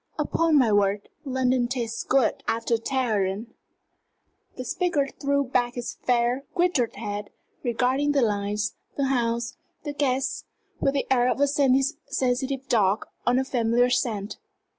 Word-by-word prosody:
Upon 330 -2 +2
my 245 -6 +4
word, 205 0 +1 0.2
London 255 -2 +1
tastes 235 -2 -3
good 260 -4 +2
after 230 +1 +1
Teheran!" 225 -5 0
And 225 +3 -8 1.1
the 255 - -5
speaker 310 -2 0
threw 280 0 +2
back 245 -2 0
his 245 -1 -4
fair, 245 +2 +2
grizzled 345 -10 +1
head, 205 -1 -5 0.3
regarding 260 +4 +1
the 275 -3 +3
lights, 210 0 -1 0.2
the 275 -2 +1
house, 235 -2 -1 0.3
the 290 - -4
guests, 270 -1 -1 0.3
with 275 - +1
the 275 - 0
air 250 -1 +4
of - - -1
a 285 - +5
sensitive 270 -1 0
dog 210 -3 +2 0.2
on 245 +1 +4
a 265 - +2
familiar 245 -1 +2
scent. 220 -5 -1
250 Hz, 140 wpm, -25 LUFS, 230-270 Hz, 1.1 s, a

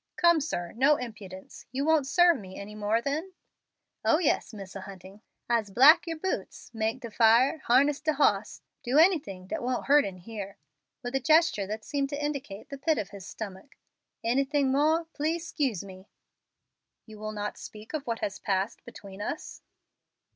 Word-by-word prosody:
"Come, 340 -2 +4
sir, 175 - -3
no 275 +5 +5
impudence. 210 -7 -9
You 270 +3 -2
won't 315 -4 +3
serve 345 0 +4
me 190 -2 -10
any 200 +1 -8
more 215 +2 0
then?" 310 +7 -3 0.7
"Oh 310 - +4
yes, 325 -8 0
Misser 195 -2 -8
Hunting. 190 +1 -12 0.3
I'se 230 -4 +1
black 275 - +6
yer 330 - -2
boots, 375 +4 -4
make 225 +3 -2
de 235 - -7
fire, 235 +7 +4
harness 275 +4 +3
de 310 0 +1
hoss, 210 -8 +1 0.2
do 250 +4 0
anything 295 - +3
dat - - -4
won't 250 0 -2
hurt 290 +1 +5
in 190 -2 -5
here," 200 +1 -8 0.5
with 245 +1 -5
a 270 - +2
gesture 310 - +3
that 215 +1 -5
seemed 280 -2 -1
to 285 0 -4
indicate 265 -9 -5
the 280 - -7
pit 305 +2 +1
of 205 - -4
his 195 -2 -10
stomach. 205 +5 -8 0.5
"Anything 270 +3 +1
more, 310 +4 +2
please 320 +3 -1
'scuse 265 - -1
me." 190 0 -12 1.0
"You 215 -2 -12
will 215 0 -4
not 210 -1 -5
speak 215 +4 -11
of 300 -4 -4
what 230 -1 -2
has 195 -1 -3
passed 195 +3 -2
between 200 -4 -11
us?" 295 - -5
240 Hz, 175 wpm, -28 LUFS, 205-295 Hz, 1.0 s, black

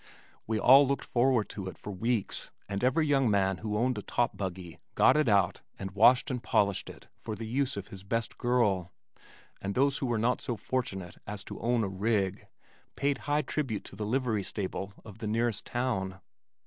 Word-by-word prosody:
We 110 0 0
all 135 +5 +8
looked 140 +1 -1
forward 125 -2 +2
to 95 -2 -6
it 95 - -7
for 105 - -7
weeks 115 +2 -2 0.2
and 100 +2 -3
every 130 +5 +3
young 135 -4 +3
man 95 -2 +2
who 105 -1 -3
owned 125 +3 +1
a - - -5
top 120 - 0
buggy 90 -3 -5 0.2
got - - +6
it 150 -5 +3
out 100 -4 +3 0.2
and 95 -1 -5
washed 115 +7 +5
and 125 -2 -2
polished 100 -4 +1
it - - -12
for 110 - -5
the 115 - -6
use 130 +1 -1
of 100 +1 -6
his 95 - -9
best 115 +4 -3
girl, 105 -8 +1 0.7
and 100 0 -3
those 140 +1 +2
who 135 - -1
were 120 -2 +1
not 120 +3 +1
so 120 - -3
fortunate 95 -10 -3
as 105 -1 -5
to - - -8
own 120 0 +1
"a - - 0
rig" 95 0 -1 0.5
paid 140 0 0
high 150 +1 +2
tribute 130 -5 -2
to - - -11
the 105 - -4
livery 120 -3 +1
stable 100 0 -4
of 110 -1 -11
the 110 - -4
nearest 115 -1 0
town. 95 -7 -2
110 Hz, 200 wpm, -30 LUFS, 100-125 Hz, 0.7 s, all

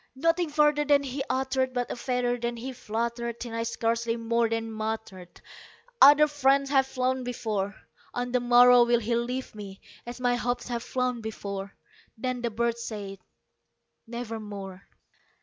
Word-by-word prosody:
Nothing 330 +4 +1
further 295 0 +3
then 285 -1 +3
he 270 0 -4
uttered 260 0 0
not 245 -1 -1
a - - -3
feather 245 0 -1
then 235 0 -3
he 260 +3 -6
fluttered 235 0 -3
Till 235 -2 -6
I 230 - -2
scarcely 230 0 -1
more 230 0 +1
than 225 0 -2
muttered 215 -5 -5 0.6
"Other 295 +1 +9
friends 275 -1 +2
have 265 -2 +4
flown 260 0 -1
before 215 -5 -3 0.4
On 245 0 -2
the 250 - +2
morrow 245 0 +7
will 240 0 +3
he 235 +2 0
leave 250 +2 -3
me, 200 -2 -9 0.3
as 240 +1 -7
my 245 -1 +1
hopes 245 0 -2
have 235 -1 -2
flown 250 -1 -2
before." 200 -3 -6 0.4
Then 255 +1 -3
the 240 - -1
bird 235 +1 -1
said, 205 -4 -6 0.9
"Nevermore." 210 -5 -7
240 Hz, 155 wpm, -27 LUFS, 225-255 Hz, 0.9 s, Other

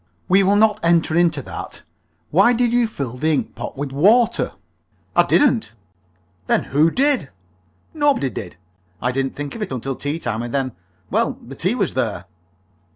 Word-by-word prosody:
"We 190 +2 +5
will 195 +1 +3
not 210 0 +3
enter 170 -1 +2
into 165 -5 +2
that. - - -8 0.5
Why 195 +9 +5
did 240 0 +1
you 240 -1 +3
fill 135 - -5
the 155 +5 +1
ink 145 - -2
pot - - -7
with 140 -1 -4
water?" 210 - +3 0.6
"I - - +7
didn't." 250 - +2 0.7
"Then - - +2
who 150 +4 +3
did?" 265 - +1 0.6
"Nobody 290 - +1
did. 90 -6 -7 0.4
I 125 - 0
didn't 135 +1 -2
think 145 -1 -5
of 230 - -8
it 210 - -3
until 130 +1 -3
tea 145 +4 -3
time, 115 -8 -3
and 120 0 -5
then 135 -2 0 0.4
well, - - +1
the - - -9
tea - - -1
was - - -1
there." 90 - -2
160 Hz, 170 wpm, -20 LUFS, 135-220 Hz, 0.7 s, I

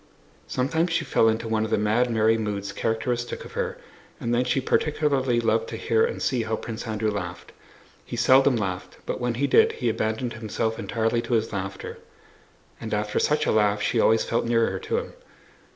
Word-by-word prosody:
Sometimes 160 +7 0
she 165 - 0
fell 115 - +3
into 110 +1 -1
one 110 -1 +1
of 110 - -2
the 110 - +2
mad, 110 +4 +2
merry 110 -1 +3
moods 105 -3 -3
characteristic 120 +2 -2
of - - -11
her, 480 +1 -3 0.4
and 120 -5 -1
then 120 +1 +3
she 135 - +1
particularly 135 -3 +1
loved 465 - +1
to - - -5
hear 450 - +2
and 475 +1 -1
see 130 -4 +1
how 110 0 -1
Prince 115 +1 -6
Andrew 110 0 -1
laughed. 90 -3 -6 0.5
He - - -7
seldom 130 +3 +5
laughed, 95 -5 -4
but - - -3
when 120 -1 -1
he 140 +4 +1
did 140 - +4
he 120 - -1
abandoned 110 +2 -1
himself 110 0 -3
entirely 115 0 0
to 120 - -4
his 110 -1 +1
laughter, 95 0 -5 0.8
and 110 -2 -3
after 105 0 -1
such 150 0 +1
a - - +2
laugh 105 -1 +3
she 115 +3 0
always 110 0 +4
felt 115 - 0
nearer 115 -5 +1
to - - -2
him. - - -4
115 Hz, 195 wpm, -25 LUFS, 110-125 Hz, 0.8 s, seldom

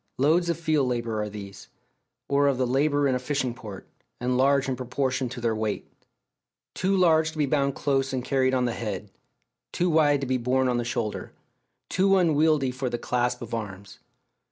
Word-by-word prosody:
Loads 165 +6 +3
of 170 - -1
field 155 -5 +1
labour 115 -3 -2
are 105 - -3
these, 100 -1 -9 0.6
or 140 0 +3
of 140 -2 +2
the 130 - +1
labour 145 +3 +2
in 130 - +1
a 125 - 0
fishing 130 -1 -1
port, 110 -6 -10 0.3
and 125 +1 0
large 135 +1 +3
in 130 - -1
proportion 130 +1 -2
to 125 +1 -7
their 115 -2 0
weight; 110 -1 -2 0.9
too 190 +1 +1
large 160 -3 +4
to - - -11
be 150 - +2
bound 140 -1 0
close 135 -2 0
and 130 -2 -3
carried 130 -1 +2
on 125 -1 +1
the 120 - -1
head, 105 -3 -5 0.6
too 180 0 0
wide 145 -3 +3
to - - -1
be 130 0 0
borne 130 +2 +1
on 125 -1 +1
the 120 - -1
shoulder, 115 -2 -3 0.5
too 195 +1 +3
unwieldy 155 -5 +3
for 130 0 -3
the 120 - -2
clasp 125 0 -1
of 115 - -9
arms. 100 -3 -6
130 Hz, 195 wpm, -26 LUFS, 120-145 Hz, 0.9 s, large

